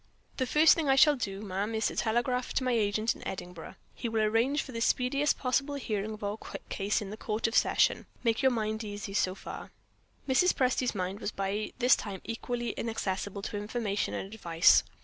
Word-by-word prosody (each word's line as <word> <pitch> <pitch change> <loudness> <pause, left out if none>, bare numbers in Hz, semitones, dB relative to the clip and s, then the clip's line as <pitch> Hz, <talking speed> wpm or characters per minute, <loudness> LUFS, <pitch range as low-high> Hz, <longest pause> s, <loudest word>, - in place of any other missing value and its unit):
"The 260 - 0
first 310 +4 +6
thing 315 -4 -1
I 270 - +5
shall 295 +2 +6
do, 200 -5 -4
ma'am, 205 +3 -2
is 220 - 0
to - - 0
telegraph 240 +2 0
to 265 - +1
my 255 - +1
agent 215 -1 +1
in - - -8
Edinburgh. 180 -2 -7 0.2
He 235 - -4
will 220 -1 +1
arrange 230 +7 +2
for 265 - -10
the 230 -2 -4
speediest 275 +5 +2
possible 275 +2 0
hearing 215 -5 -3
of 210 - -12
our 205 +2 -3 0.3
case 205 +2 -1
in 195 - -7
the 215 - -7
Court 215 0 -2
of 225 - 0
Session. - - +3 0.2
Make 230 0 +1
your 265 - +5
mind 220 -2 -2
easy 205 -1 -6
so 185 -2 +1
far." - - -8 0.6
Mrs. 275 +8 +3
Presty's 255 -2 +1
mind 190 +1 -3
was - - -2
by 200 +1 -3
this 250 -1 +5
time 195 -3 -6
equally 240 +1 -3
inaccessible 200 -3 -3
to 205 - -4
information 210 -1 -2
and 195 +2 -5
advice. 170 -6 +5
220 Hz, 200 wpm, -30 LUFS, 205-250 Hz, 0.6 s, first